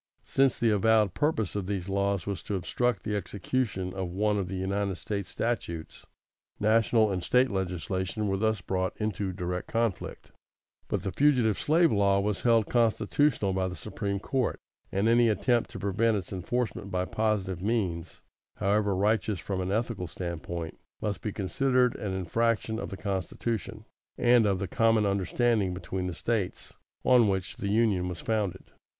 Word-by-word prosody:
= - - -45
Since 135 -2 +2
the 115 -1 +2
avowed 105 -1 +3
purpose 145 - 0
of 100 -3 -2
these 95 -3 -3
laws 100 -2 0
was 100 -4 -3
to 105 - -3
obstruct 120 +7 -1
the 105 -1 -2
execution 100 -2 -2
of 95 -2 -3
one 105 +3 +1
of 95 - -2
the 95 - -4
United 95 +1 -1
States 100 0 -4
statutes, 85 -7 -4 0.5
national 110 0 +3
and 90 -2 -2
State 125 +4 +3
legislation 95 +2 -2
were 95 0 0
thus 110 -1 0
brought 95 -1 -2
into 105 -3 -2
direct 90 -1 -4
conflict; 115 -4 -2 0.6
but - - -2
the 95 - -2
Fugitive 125 -6 +3
Slave 165 +2 +4
Law 100 -1 +3
was 100 0 -1
held 115 -3 +3
constitutional 115 -1 +2
by 95 0 0
the 90 - -5
Supreme 100 -1 -3
Court, 130 +4 -1 0.3
and 100 +3 +1
any 120 0 +5
attempt 120 +2 +1
to - - -8
prevent 105 +3 +1
its 95 0 -6
enforcement 105 +2 -2
by 90 -1 -1
positive 100 -4 -1
means, 95 -6 -2 0.3
however 100 0 +1
righteous 105 0 +1
from 95 -2 -3
an 90 +1 -2
ethical 110 -4 -1
standpoint, 85 -1 -5 0.2
must 105 -2 -3
be 105 - -3
considered 125 +5 +1
an 100 - -3
infraction 110 +4 0
of - - -5
the 95 - -6
Constitution, 105 +3 -3 0.3
and 120 -2 +5
of 100 -2 +2
the 95 - -3
common 115 +2 +3
understanding 100 0 +1
between 90 0 -4
the 90 - -4
States, 110 0 -2 0.3
on 125 -3 +6
which 95 -2 -2
the 100 - -3
Union 100 -4 +2
was 90 - -6
founded. 105 -5 -1
100 Hz, 165 wpm, -28 LUFS, 95-115 Hz, 0.6 s, on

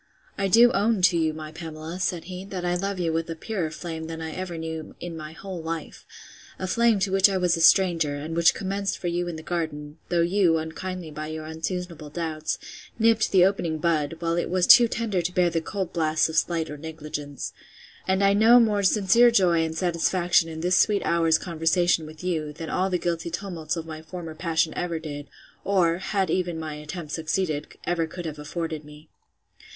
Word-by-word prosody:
I 195 - 0
do 235 +5 +6
own 205 -1 +1
to 180 -1 +5
you, 160 -1 +2
my 155 0 -8
Pamela, 160 +1 -7
said 180 -2 -1
he, 185 +1 -7
that 185 -3 -5
I 175 - +1
love 195 +2 -2
you 170 -3 -1
with 165 +1 -2
a 165 - -3
purer 180 -1 -3
flame 160 +1 -6
than 165 0 -6
ever 170 +2 -5
I - - -6
knew 160 -1 -6
in 175 -1 -6
my 155 -1 -8
whole 185 0 -7
life; 160 0 -6 0.5
a 190 - -4
flame 230 +3 +3
to 195 -1 0
which 195 +1 +5
I 195 - 0
was 180 -1 +2
a 165 - -3
stranger; 165 -4 +4
and 155 +3 -5
which 170 +1 +4
commenced 195 0 -2
for - - -10
you 175 0 -1
in 170 - -4
the 160 - -8
garden; 155 -3 -4
though 175 -1 +2
you, 175 -2 +3
unkindly, 165 +1 -5
by 155 +1 -6
your 155 0 -6
unseasonable 160 0 -5
doubts, 155 0 -3 0.4
nipped 225 -1 +3
the 185 -2 +6
opening 175 -5 0
bud, 155 -2 0
while 165 0 -1
it 175 - -1
was 180 0 +2
too 240 -1 +9
tender 215 -5 -1
to 175 +2 -3
bear 175 -1 +3
the 165 0 0
cold 190 +1 -4
blasts 155 -2 +2
of 160 - -5
slight 165 -1 0
or 150 - -8
negligence. 150 -3 -6 0.5
And 190 +1 +2
I 200 0 +5
know 225 +4 +7
more 215 -3 +3
sincere 210 +4 +5
joy 180 -7 +3
and 160 0 -3
satisfaction 175 -1 +2
in 160 0 -6
this 180 +1 +2
sweet 205 -2 +3
hour's 165 -1 +3
conversation 165 -1 +1
with 155 +2 -12
you, 160 -5 -2
than 160 +1 -6
all 185 +1 +1
the 180 - +1
guilty 170 -1 -2
tumults 175 -2 -4
of 165 -1 -5
my 155 -1 -8
former 165 0 -7
passion 160 -1 0
ever 175 -2 -2
did, 145 -2 -7 0.4
or 175 -4 +2
(had 195 0 -1
even 175 -3 -1
my 155 -1 -5
attempts 150 +1 -7
succeeded) 160 -1 -2
ever 170 -2 0
could 175 +2 -8
have 155 -2 -5
afforded 155 0 -4
me. 150 +1 -14
170 Hz, 210 wpm, -25 LUFS, 160-185 Hz, 0.5 s, too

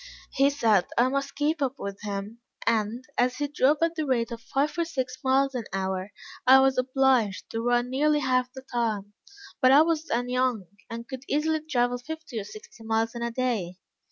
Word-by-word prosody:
He 275 +1 +3
said 225 -9 +2
I 245 +2 +4
must 275 +1 -2
keep 295 +2 0
up 270 -1 0
with 200 0 -6
him, 205 +2 -5 0.3
and, 230 +2 0
as 250 +1 +2
he 290 - -1
drove 290 +1 +2
at 330 0 +2
the 315 -2 -2
rate 240 -2 0
of 230 -1 -6
five 275 +6 -1
or - - +3
six 260 -6 -4
miles 270 +1 +2
an 245 -4 -3
hour, 190 0 -2 0.4
I 265 +1 +9
was 265 -1 +3
obliged 255 -5 +1
to 225 - -2
run 245 +1 +1
nearly 295 +3 +2
half 255 -1 +1
the 265 0 -10
time; 220 -5 -2 0.5
but 255 -1 +6
I 290 +3 +8
was 320 -1 0
then 245 +2 -1
young, 250 -5 0 0.2
and 230 +1 -7
could 260 -2 -7
easily 315 +2 +1
travel 245 -5 0
fifty 315 -2 -6
or 200 - -6
sixty 430 - -12
miles 225 0 0
in 235 - -6
a 235 - -1
day. 230 -8 -2
255 Hz, 200 wpm, -26 LUFS, 230-275 Hz, 0.5 s, I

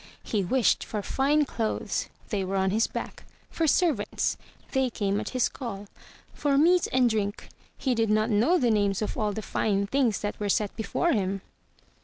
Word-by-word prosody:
He 210 -3 -1
wished 245 +6 +2
for 210 -2 -4
fine 290 +6 +2
clothes. 225 -4 -2 0.2
They 200 -3 -1
were 190 +1 -3
on 190 0 +2
his 220 +3 +2
back. - - -6 0.3
For 325 - 0
servants. 295 - +1 0.4
They 265 -2 +1
came 205 -3 -1
at - - -4
his 255 -2 +1
call. 210 -6 -6 0.5
For 280 -2 +1
meat 345 +4 +4
and 255 -1 +4
drink. 210 -3 -2 0.3
He 260 - 0
did 225 -2 +1
not 215 +2 +2
know 235 - +4
the 245 -7 +2
names 205 -1 +1
of - - -3
all 210 -1 0
the 215 +1 -5
fine 200 -1 0
things 240 -1 +1
that 205 - -4
were 205 -1 -2
set 210 0 0
before 240 +9 0
him. 195 - 0
220 Hz, 185 wpm, -27 LUFS, 205-265 Hz, 0.5 s, meat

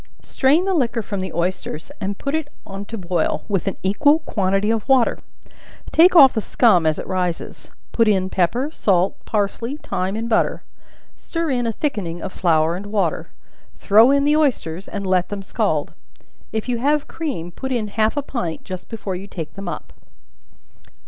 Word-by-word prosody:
Strain 290 +7 +2
the 390 - +1
liquor 240 -8 0
from 200 -1 -4
the 185 -2 -4
oysters, 170 - -3
and 195 0 -3
put 280 - -4
it 315 -2 -1 0.2
on 195 +1 -7
to 225 - -7
boil, 175 -3 -1
with 200 -3 -1
an 195 - -2
equal 285 +11 +4
quantity 200 -8 0
of 225 +3 -2
water; 260 -3 +3 0.7
take 355 +3 +6
off 275 -6 +9
the 220 - -1
scum 185 -8 +3
as 155 - +1
it - - -5
rises; 180 -2 -3 0.2
put 230 -1 +3
in 190 -3 +2
pepper, 235 - 0
salt, 190 - +1
parsley, 230 +5 -2
thyme 190 -8 -3
and 225 +1 -3
butter; 230 - +1 0.5
stir 330 -3 -3
in 245 -2 0
a - - +1
thickening 205 - -3
of 190 +2 -6
flour 165 -2 +2
and 195 +3 -7
water; 200 -6 -1 0.5
throw 220 +4 +6
in 280 0 +3
the 295 +1 +4
oysters, 200 - 0
and 200 -1 -5
let 185 -1 +1
them 200 -1 -5
scald. - - -1 0.6
If 220 +1 -3
you 245 -2 -1
have 290 +3 +1
cream, 255 - -4
put 265 +9 -6
in 225 -4 -1
half 220 +5 0
a 290 - 0
pint 180 - -4
just 185 -1 -8
before 210 -4 -4
you 190 +2 -7
take 165 -6 -7
them 195 -1 -8
up. 155 - -7
205 Hz, 180 wpm, -21 LUFS, 185-260 Hz, 0.7 s, off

